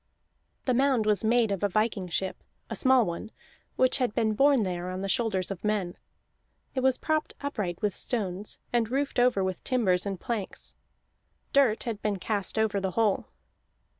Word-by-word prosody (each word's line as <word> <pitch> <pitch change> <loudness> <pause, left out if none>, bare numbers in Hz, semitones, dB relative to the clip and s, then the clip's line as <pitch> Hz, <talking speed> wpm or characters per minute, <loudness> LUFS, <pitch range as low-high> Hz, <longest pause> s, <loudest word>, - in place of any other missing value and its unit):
The 255 - +2
mound 260 -3 +3
was 210 -2 +2
made 225 -1 +3
of 195 - -2
a 205 - +2
viking 215 -1 0
ship, 185 +2 -3 0.3
a - - -2
small 260 -3 +4
one, 170 +5 -5 0.5
which 255 +2 +3
had 245 -5 0
been 220 -1 +2
borne 275 +1 +4
there 180 -1 -3
on 185 +1 -4
the 195 - -2
shoulders 195 -3 0
of 190 - -6
men. 205 -4 -1 0.8
It 265 - -1
was 260 0 +3
propped 310 -1 -1
upright 210 - -3
with 205 -2 +1
stones, 200 -4 -3 0.2
and 235 -2 +2
roofed 275 0 -1
over 245 -5 +3
with 185 -2 -3
timbers 200 -8 +1
and 195 -2 -3
planks; 220 -3 -5 0.8
dirt 265 -6 +4
had 225 -4 -4
been 210 -2 0
cast 205 +2 -3
over 215 -2 +1
the 190 -1 -1
whole. 220 -4 +2
215 Hz, 175 wpm, -28 LUFS, 190-245 Hz, 0.8 s, small